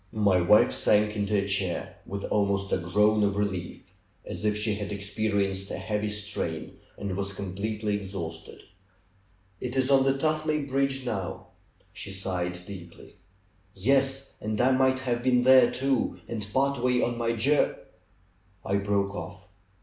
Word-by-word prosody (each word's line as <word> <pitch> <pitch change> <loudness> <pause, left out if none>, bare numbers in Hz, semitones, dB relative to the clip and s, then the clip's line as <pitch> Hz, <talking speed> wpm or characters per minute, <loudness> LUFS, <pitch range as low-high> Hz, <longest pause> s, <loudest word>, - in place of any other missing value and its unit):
My 100 -4 +3
wife 95 +5 +5
sank 105 0 +2
into 105 0 0
a 100 - -2
chair, 95 -3 -1
with 100 0 -5
almost 100 -1 0
a - - +3
groan 105 +5 +3
of 100 -1 +1
relief, 95 -4 -2 0.4
as - - -6
if 105 -1 +1
she 105 0 +1
had 105 -1 -4
experienced 100 -1 -1
a - - -4
heavy 105 0 -2
strain, 105 -6 -4 0.2
and 100 -2 -4
was 100 0 -2
completely 105 +2 -2
exhausted. 85 -5 -7 1.0
^Tt 125 +1 -4
is 130 +1 +2
on 135 -1 +6
the 135 0 +3
Tuthmay 155 0 0
bridge 135 -1 0
now," 100 -7 -4 0.4
she - - -6
sighed 90 -2 -3
deeply. 85 -4 -11 0.6
^^Yes! 135 +5 +1
And 105 0 -2
I 130 +2 +4
might 130 0 +3
have 120 -2 -1
been 125 -1 +3
there, 130 -1 +7
too, 135 +1 0
and 105 -3 -5
part 135 0 +1
way 125 -1 +3
on 120 - 0
my 115 0 0
jour 135 +6 +3 0.5
" 95 0 -36
I 100 - +1
broke 100 0 0
off. 90 +2 -8
105 Hz, 155 wpm, -27 LUFS, 100-125 Hz, 1.0 s, there